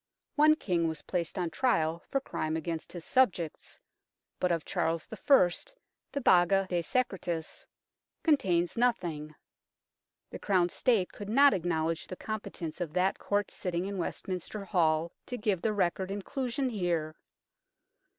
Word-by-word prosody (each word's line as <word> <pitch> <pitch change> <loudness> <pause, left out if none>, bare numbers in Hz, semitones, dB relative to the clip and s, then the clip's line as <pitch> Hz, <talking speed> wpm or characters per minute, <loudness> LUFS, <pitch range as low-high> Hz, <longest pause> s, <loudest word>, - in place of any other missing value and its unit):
One 310 +1 +6
King 175 - 0
was 160 -1 -4
placed 170 -2 -2
on 175 -3 -1
trial 165 -10 +1
for 275 - 0
crime 155 -11 -3
against 165 0 -4
his 175 -2 -8
subjects, 185 - +1 0.6
but 180 - +1
of 165 -2 -1
Charles 165 0 -1
I. 195 -3 +4 0.6
the 280 - -2
Baga 190 -2 +4
de 175 -2 0
Secretis 180 -6 -2 0.6
contains 180 - +2
nothing; 165 -11 0 1.0
the - - -7
crowned 180 -3 +2
State 220 -8 +2
could 205 -1 -8
not 280 +4 +6
acknowledge 165 -3 -1
the 185 - -6
competence 185 -6 -6
of 160 -3 -3
that 185 +2 +1
Court 205 0 -1
sitting 180 0 -2
in 200 -1 -4
Westminster 190 +3 -4
Hall 165 -3 +2 0.2
to 250 - -4
give 210 -6 0
the 220 - +1
record 190 -2 0
inclusion 250 +6 -2
here. 170 -6 -1
180 Hz, 140 wpm, -30 LUFS, 165-215 Hz, 1.0 s, One